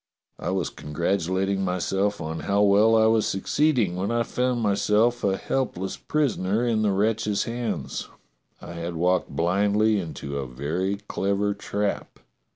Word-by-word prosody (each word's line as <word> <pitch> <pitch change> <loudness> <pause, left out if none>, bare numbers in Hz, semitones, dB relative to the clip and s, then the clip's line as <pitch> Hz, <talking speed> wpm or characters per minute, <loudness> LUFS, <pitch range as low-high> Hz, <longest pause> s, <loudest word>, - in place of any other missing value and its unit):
I - - -3
was 95 -3 -1
congratulating 95 +5 -1
myself 95 +3 0
on 80 +1 -4
how 100 +1 +1
well 105 +3 +5
I 110 0 +5
was 110 -1 +3
succeeding, 115 - +1
when 95 +2 -2
I 120 0 +1
found 125 +1 -1
myself 110 +3 +2
a 95 -1 +2
help 130 -8 -2
less 95 +1 -3
prisoner 115 -7 0
in 115 -2 +1
the 105 - +2
wretches' 105 +1 +1
hands. 115 - -4 0.5
I 85 - -9
had 85 0 -5
walked 90 +2 +1
blindly 100 +5 +2
into 70 -5 -5
a 65 - -4
very 80 +10 -2
clever 100 +1 0
trap. 100 0 -3
100 Hz, 150 wpm, -25 LUFS, 90-110 Hz, 0.5 s, well